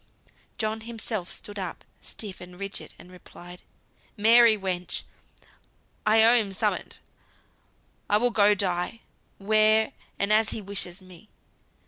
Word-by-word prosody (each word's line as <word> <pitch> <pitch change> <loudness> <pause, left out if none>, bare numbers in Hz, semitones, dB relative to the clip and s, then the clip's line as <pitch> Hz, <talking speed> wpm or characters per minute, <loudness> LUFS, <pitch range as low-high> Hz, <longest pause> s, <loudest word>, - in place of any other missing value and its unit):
John 220 0 -2
himself 225 -4 -5
stood 205 -1 -8
up, 185 -3 -7 0.2
stiff 200 -4 -7
and 180 +1 -12
rigid, 195 0 -6
and 180 - -15
replied, 180 0 -14 0.6
"Mary, 225 +1 +6
wench! 180 -3 -3 1.0
I 220 +1 +6
owe 230 +2 +8
him 220 -5 +3
summut. - - -2 1.1
I 205 - +4
will 245 +3 +1
go 205 -2 +4
die, 185 +2 -2 0.4
where, 215 +2 +3 0.2
and 200 +1 +1
as 215 0 +3
he - - -4
wishes 195 -2 -3
me. 185 +2 -16
205 Hz, 125 wpm, -26 LUFS, 185-220 Hz, 1.1 s, owe